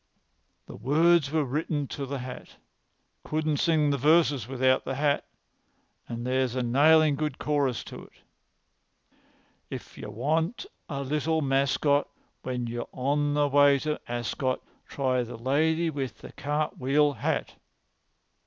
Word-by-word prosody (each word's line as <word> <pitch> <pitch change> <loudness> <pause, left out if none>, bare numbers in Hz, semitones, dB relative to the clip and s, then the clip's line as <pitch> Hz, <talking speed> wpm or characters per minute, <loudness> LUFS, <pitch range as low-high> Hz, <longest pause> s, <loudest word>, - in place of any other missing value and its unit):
"The - - -10
words 150 - +3
were 155 -2 +1
written 145 +1 -2
to 140 -1 -5
the 140 +1 -3
hat. 125 -1 -8 0.7
I - - -15
couldn't 155 -1 0
sing 155 -3 +2
the 140 - -1
verses 145 -4 +3
without 130 0 +2
the 135 - -3
hat. 145 +1 0 0.8
But 120 0 -5
there's 130 0 0
a 130 - 0
nailin' 150 +5 +5
good 150 -1 -3
chorus 140 -5 0
to - - -10
it: - - -21 1.6
"'If - - -8
you - - -7
want 160 - -1 0.2
a 140 -2 -3
little 150 +3 0
mascot 140 +1 +2 0.3
When 125 -1 -3
you're 120 0 -5
on 145 +3 0
the 145 0 +3
way 145 0 +5
to 150 +2 -3
Ascot, 120 +2 -2 0.2
Try 130 -2 0
the 120 -1 -6
lady 160 +7 +1
with 135 -4 -4
the - - -11
cartwheel 145 0 0
hat.'" - - -2
140 Hz, 140 wpm, -27 LUFS, 130-150 Hz, 1.6 s, nailin